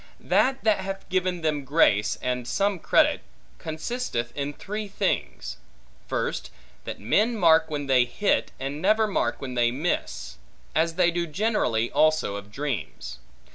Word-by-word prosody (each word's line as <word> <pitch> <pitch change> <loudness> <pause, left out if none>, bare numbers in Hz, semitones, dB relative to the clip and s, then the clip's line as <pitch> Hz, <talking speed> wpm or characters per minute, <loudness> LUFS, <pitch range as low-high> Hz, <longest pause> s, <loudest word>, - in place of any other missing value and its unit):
That 270 +1 +2
that 215 -3 +3
hath 195 0 -5
given 185 -1 0
them 150 -3 0
grace, 130 -8 +3
and 125 -1 -2
some 200 +6 0
credit, - - +3 0.4
consisteth 160 - -3
in 140 0 -2
three 210 +7 -5
things. 195 - -2 0.5
First, - - -2 0.4
that - - -6
men 215 - +2
mark 165 -5 +5
when 145 -2 -3
they 130 -2 +4
hit, 205 +11 0
and 140 +3 -4
never 215 +4 +4
mark 205 - -1
when 130 -2 -5
they 120 -1 +3
miss; 120 - -3 0.4
as 165 +1 +1
they 175 -1 +4
do 170 0 -1
generally 155 - 0
also 155 -9 +2
of 100 0 -8
dreams. 120 - -4
155 Hz, 145 wpm, -26 LUFS, 125-195 Hz, 0.5 s, mark